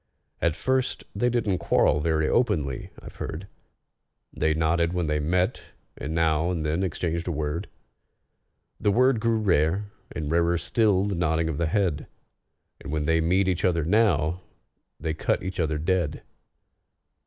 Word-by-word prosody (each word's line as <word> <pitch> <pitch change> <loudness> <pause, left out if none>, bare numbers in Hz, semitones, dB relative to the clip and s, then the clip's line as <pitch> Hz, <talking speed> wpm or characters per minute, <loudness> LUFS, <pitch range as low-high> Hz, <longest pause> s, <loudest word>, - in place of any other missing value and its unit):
At 80 -2 +1
first 130 +8 0
they 120 +5 +1
didn't 105 -6 0
quarrel 75 - +3
very 80 0 +1
openly, 75 - 0
I've - - -12
heard; 85 +5 -5 0.9
They 80 +1 +1
nodded 85 +2 +1
when 90 -2 0
they 75 -1 0
met, 90 +7 0 0.3
and 80 +4 -5
now 80 0 +2
and 85 -4 -2
then 80 +4 0
exchanged 85 -2 -2
a - - 0
word: 80 +4 -3 1.1
The - - +1
word 125 +2 +3
grew 115 0 +1
rare, 95 0 +1 0.2
and 75 -3 -4
rarer 85 +1 +2
still 100 0 +2
the 100 0 -1
nodding 80 -2 0
of 75 - -3
the 85 - +1
head, 90 -5 0 0.7
And 75 - -8
when 75 -1 -1
they 80 +1 +2
meet 90 +4 +2
each 90 -2 0
other 85 -4 +2
now, 90 -4 +2 0.6
they 80 - -2
cut 80 - -1
each 95 0 -5
other 80 -2 0
dead. 80 -1 -1
85 Hz, 155 wpm, -26 LUFS, 80-95 Hz, 1.1 s, quarrel